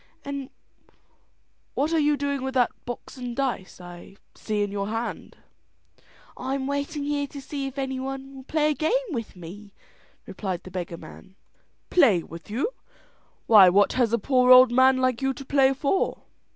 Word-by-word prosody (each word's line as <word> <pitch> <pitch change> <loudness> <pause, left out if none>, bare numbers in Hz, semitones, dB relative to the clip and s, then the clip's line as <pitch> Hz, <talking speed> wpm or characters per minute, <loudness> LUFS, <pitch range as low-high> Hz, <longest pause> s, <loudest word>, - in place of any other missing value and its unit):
"An' 280 -1 -5 1.3
what 300 +4 0
are 325 - +3
you 295 -1 +2
doing 280 -1 -2
with 265 0 -4
that 245 -2 +3
box 245 +3 -8
and 245 -2 -5
dice 250 -10 -3
I 175 +2 -12 0.2
see 210 -2 -2
in 205 - -3
your 200 -1 -3
hand?" 225 +2 -5 1.0
"I 260 +2 -3
am 270 -1 -3
waiting 285 +2 -3
here 285 0 -1
to 280 - -9
see 275 0 -5
if 270 +1 -9
any 265 -1 -2
one 270 +1 -6
will 265 - -10
play 305 +2 +1
a - - +1
game 455 - -1
with 230 -8 -5
me," 195 +4 -11 0.5
replied 185 -4 -5
the 185 - -11
beggar 175 -2 -5
man. 185 +4 -14 0.6
"Play 225 - +4
with 165 +3 -11
you! 270 - -2 0.7
Why 205 -5 +8
what 200 +3 +3
has 245 -4 +1
a 235 - +3
poor 250 +2 +2
old 255 -1 +9
man 260 +1 +5
like 255 -1 0
you 270 0 0
to 275 - -9
play 270 -1 +3
for?" 280 +7 -1
260 Hz, 180 wpm, -25 LUFS, 210-280 Hz, 1.3 s, old